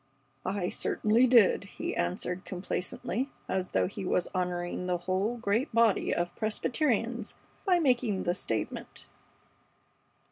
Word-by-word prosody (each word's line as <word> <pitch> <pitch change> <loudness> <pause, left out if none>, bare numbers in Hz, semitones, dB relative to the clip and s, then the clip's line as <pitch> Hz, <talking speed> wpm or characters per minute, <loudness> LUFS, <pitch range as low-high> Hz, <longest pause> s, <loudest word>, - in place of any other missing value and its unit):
"I 190 -2 -1
certainly 225 +4 +2
did," 235 -5 +5
he - - -5
answered, 180 - -2
complacently, 185 +6 -3 0.2
as 185 -1 -1
though - - +2
he 195 - -5
were 180 - +2
honoring 180 0 -2
the 180 -1 +1
whole 190 +6 -1
great 230 +5 0
body 230 -3 +4
of 175 0 -1
Presbyterians 230 0 0 0.3
by 365 -2 +5
making 245 - +2
the 175 - +1
statement. 110 - -4
200 Hz, 120 wpm, -30 LUFS, 180-235 Hz, 0.3 s, did